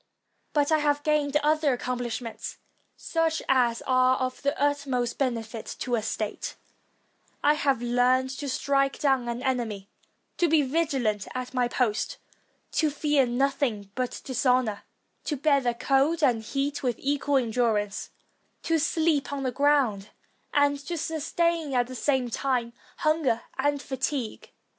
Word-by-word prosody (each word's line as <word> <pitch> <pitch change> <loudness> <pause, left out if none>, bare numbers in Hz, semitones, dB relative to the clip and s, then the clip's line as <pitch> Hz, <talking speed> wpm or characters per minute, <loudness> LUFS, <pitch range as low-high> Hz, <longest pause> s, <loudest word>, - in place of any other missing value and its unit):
But 290 0 +2
I 315 - +4
have 290 -1 +1
gained 295 -2 +2
other 305 -2 +3
accomplish 245 -1 -3
ments, 230 -2 -7 0.4
such 325 -1 0
as 245 -3 +2
are 255 0 +4
of 255 -1 -3
the 280 +1 -1
utmost 275 -4 0
benefit 230 -4 -2
to 250 - -4
a 230 - +2
state; 215 -1 -3 0.9
I 295 - +5
have 275 -5 0
learned 250 +2 +2
to 285 - -3
strike 275 +1 +1
down 265 -4 +1
an 235 +2 -4
enemy; 225 -6 -2 0.5
to 345 - +3
be 315 -2 +4
vigilant 260 -8 0
at 255 0 -4
my 250 -2 +2
post; 240 -3 -1 0.5
to 310 - +2
fear 290 -2 +2
nothing 245 -5 0
but 255 +1 -3
dishonor; 250 -4 +1 0.4
to 300 - -1
bear 280 -3 +2
cold 275 +6 +2
and 240 -5 +3
heat 275 +5 -2
with 245 -3 0
equal 285 0 +1
endurance; 225 -4 0 0.5
to 330 -1 +2
sleep 315 -1 +1
on 280 -1 -3
the 255 - 0
ground; 260 -7 +2 0.4
and 285 0 +3
to 345 - -2
sustain 320 -1 -1
at 245 -1 +3
the 255 - -9
same 260 0 +1
time 245 -2 -1 0.2
hunger 305 -7 +1
and 285 +1 0
fatigue. 265 -3 -3
265 Hz, 145 wpm, -27 LUFS, 245-290 Hz, 0.9 s, I